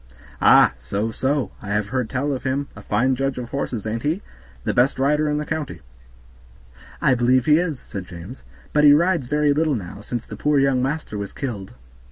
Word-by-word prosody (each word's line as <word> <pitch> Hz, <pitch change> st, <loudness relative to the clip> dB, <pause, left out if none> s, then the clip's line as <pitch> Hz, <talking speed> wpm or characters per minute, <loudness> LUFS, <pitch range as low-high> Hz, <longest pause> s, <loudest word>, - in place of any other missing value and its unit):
"Ah! -, -, +7 dB
so, 100 Hz, -, -2 dB
so, 135 Hz, +3 st, -1 dB
I 105 Hz, -, -9 dB
have 105 Hz, 0 st, 0 dB
heard 125 Hz, -2 st, -1 dB
tell 140 Hz, +2 st, -1 dB
of 130 Hz, -, -4 dB
him; 135 Hz, +2 st, -1 dB, 0.2 s
fine 130 Hz, +5 st, +2 dB
judge 135 Hz, 0 st, -1 dB
of 120 Hz, -2 st, -5 dB
horses, 125 Hz, -6 st, -3 dB
ain't 110 Hz, +1 st, -2 dB
he? 160 Hz, +9 st, -1 dB, 0.4 s
the -, -, -1 dB
best 125 Hz, +3 st, +3 dB
rider 150 Hz, +3 st, +2 dB
in 150 Hz, -, 0 dB
the 150 Hz, -, -2 dB
county." 150 Hz, -, -4 dB, 1.2 s
"I 135 Hz, -, +3 dB
believe 125 Hz, 0 st, +3 dB
he 150 Hz, +1 st, +5 dB
is," 165 Hz, -7 st, -2 dB
said 95 Hz, -2 st, -8 dB
James, 90 Hz, +9 st, -10 dB, 0.3 s
"but 150 Hz, -, +4 dB
he 145 Hz, -1 st, +9 dB
rides 165 Hz, -3 st, +2 dB
very 150 Hz, +1 st, +2 dB
little 155 Hz, -1 st, +1 dB
now, 100 Hz, -1 st, -7 dB
since 120 Hz, +2 st, -5 dB
the -, -, -8 dB
poor 150 Hz, 0 st, +1 dB
young 135 Hz, -2 st, +3 dB
master 135 Hz, -5 st, -3 dB
was 100 Hz, -1 st, -5 dB
killed." 105 Hz, -, -5 dB
130 Hz, 200 wpm, -22 LUFS, 110-150 Hz, 1.2 s, he